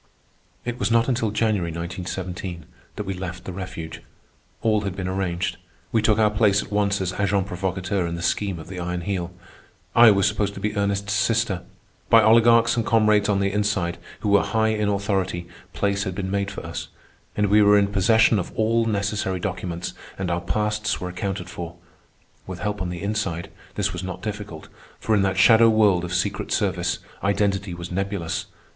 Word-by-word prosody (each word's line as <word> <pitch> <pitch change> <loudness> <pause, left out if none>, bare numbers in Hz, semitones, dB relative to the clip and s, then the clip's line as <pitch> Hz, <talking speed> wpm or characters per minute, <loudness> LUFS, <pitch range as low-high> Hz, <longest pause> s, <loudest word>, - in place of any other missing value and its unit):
It 120 0 -4
was - - +1
not 115 0 +3
until 120 -4 +1
January, 105 -5 0
1917, 90 +1 -5 0.3
that 105 - -3
we 95 -1 -3
left 90 -1 -6
the 95 - -6
refuge. 85 -4 -7 0.6
All 110 -2 +3
had 100 -3 -4
been 95 -1 -3
arranged. 95 -2 -2 0.3
We 110 - +2
took 105 0 +3
our 105 -1 +4
place 105 -2 +3
at - - -13
once 100 -1 +1
as 90 -1 -1
agents 100 -1 +1
provocateurs 95 -1 -2
in 85 - -3
the 85 - -5
scheme 100 -1 0
of 80 - -9
the 95 -1 -7
Iron 90 0 -3
Heel. 90 -2 -3 0.6
I 115 -1 +9
was 100 -2 +4
supposed 100 -1 -1
to - - -6
be 105 0 -2
Ernest's 100 0 0
sister. 105 -2 +1 0.5
By 115 -1 +7
oligarchs 115 +1 +5
and 115 - +1
comrades 105 -2 +3
on 100 -1 +2
the 100 0 +1
inside 100 -4 0 0.2
who 105 - -1
were 100 0 +5
high 110 -1 +1
in 105 -1 0
authority, 95 -3 -1 0.2
place 100 0 0
had 95 -3 -4
been 95 -1 -3
made 100 0 0
for 100 - -7
us, - - -5 0.5
we 105 0 +4
were 105 0 +6
in 100 - +4
possession 105 +2 +4
of 90 - -4
all 115 +1 +2
necessary 100 -3 -1
documents, 90 -3 -4 0.2
and 95 -2 -2
our 85 0 -1
pasts 105 +3 -1
were 90 - -4
accounted 90 0 -4
for. 85 -2 -7 0.7
With 95 -1 -5
help 105 +1 -3
on 90 - -2
the 90 +1 -5
inside, 100 -5 -2 0.2
this - - 0
was 90 - -4
not 90 -1 -6
difficult, 105 -6 -6 0.3
for 110 - 0
in 105 - +4
that 95 -1 0
shadow 115 +4 +7
world 105 -5 +4
of 90 - -5
secret 90 - -1
service - - 0 0.3
identity 100 -2 0
was 85 0 -7
nebulous. 95 -2 -2
100 Hz, 190 wpm, -23 LUFS, 90-105 Hz, 0.7 s, I